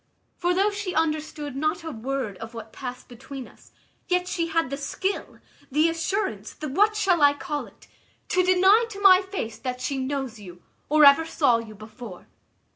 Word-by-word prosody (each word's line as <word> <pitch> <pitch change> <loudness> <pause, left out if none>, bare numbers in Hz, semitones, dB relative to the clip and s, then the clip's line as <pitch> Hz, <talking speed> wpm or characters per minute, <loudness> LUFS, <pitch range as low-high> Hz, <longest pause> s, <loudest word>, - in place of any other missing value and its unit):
For 355 0 0
though 400 +3 +3
she 400 -3 -4
understood 305 -2 -2
not 310 +5 -1
a 320 - -5
word 255 -3 -3
of 225 +1 -8
what 225 -1 -9
passed 250 -1 -7
between 260 +1 -9
us, - - -20 0.4
yet 360 0 +1
she 335 -2 -1
had 330 -4 0
the 275 - -2
skill, 380 +7 -3 0.3
the 305 +4 +3
assurance, 330 - -2
the 310 - -6
what 415 +9 +3
shall 380 -6 +2
I 285 0 +6
call 290 0 -4
it? - - -19 0.4
to 365 - +3
deny 380 +5 +5
to 400 -3 -8
my 385 -2 +7
face 375 - -5
that 250 -1 -4
she 265 +2 -2
knows 265 -3 -3
you, 180 -3 -12 0.3
or 305 0 +6
ever 280 +3 +7
saw 285 -7 +2
you 220 -2 -9
before. 215 -2 -11
295 Hz, 185 wpm, -25 LUFS, 250-360 Hz, 0.4 s, my